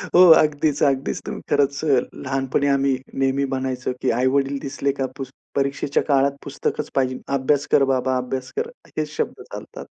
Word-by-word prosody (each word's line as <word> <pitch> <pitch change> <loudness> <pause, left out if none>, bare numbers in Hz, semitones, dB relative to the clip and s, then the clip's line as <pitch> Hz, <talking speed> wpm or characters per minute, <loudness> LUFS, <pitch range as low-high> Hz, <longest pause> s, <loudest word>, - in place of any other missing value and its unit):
हो, 180 - +8 0.2
अगदीच, 150 -1 +1
अगदीच. 135 -1 +1
तुम्ही - - -5
खरंच 140 +1 +1
अ, 135 -5 +4
लहानपणी 135 +1 -1
आम्ही 140 -1 +2 0.2
नेहमी 135 +1 +1
म्हणायचो 130 -1 -2
की - - +1
आई-वडील 135 +2 +1
दिसले 140 0 -1
का 135 - +1
पुस 135 -1 -6 0.2
परीक्षेच्या 140 0 0
काळात 140 -1 +3
पुस्तकच 145 +1 -3
पाहिजे. 130 -1 0 0.2
"अभ्यास 140 +2 +1
कर 140 - +5
बाबा. 130 0 0
अभ्यास 125 +1 -4
कर." 465 +1 -1 0.3
हेच - - -2
शब्द 460 - -3
चालतात - - -8
135 Hz, 160 wpm, -22 LUFS, 130-140 Hz, 0.3 s, हो